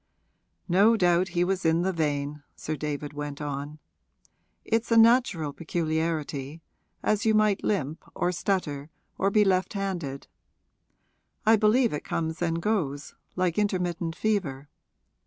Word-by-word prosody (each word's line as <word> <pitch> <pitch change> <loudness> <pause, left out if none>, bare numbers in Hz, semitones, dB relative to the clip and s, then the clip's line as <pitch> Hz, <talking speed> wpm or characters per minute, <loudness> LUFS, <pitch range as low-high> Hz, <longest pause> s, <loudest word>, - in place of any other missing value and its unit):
'No 200 +6 +5
doubt 180 -1 +3
he 175 - +4
was 190 +1 -1
in 165 +1 +2
the 190 +1 0
vein,' 150 -2 -2
Sir 155 - -4
David 150 0 -4
went 145 -1 -5
on. 145 0 -5 0.9
'It's 230 +1 0
a 230 - +5
natural 225 - +4
peculiarity 160 -2 -2 0.4
as 210 -1 +1
you 220 -1 +3
might 215 -2 +2
limp 160 -5 -1
or 180 - 0
stutter 165 -6 -2 0.3
or 195 - +3
be 210 +1 +4
left 185 -1 +1
handed. 175 -9 -3 1.2
I 220 +1 +7
believe 225 +2 +3
it 150 - -3
comes 160 +1 -3
and 165 -1 0
goes, 165 -8 -2 0.2
like 185 0 0
intermittent 175 -5 -1
fever. 155 -11 -1
170 Hz, 135 wpm, -27 LUFS, 150-200 Hz, 1.2 s, I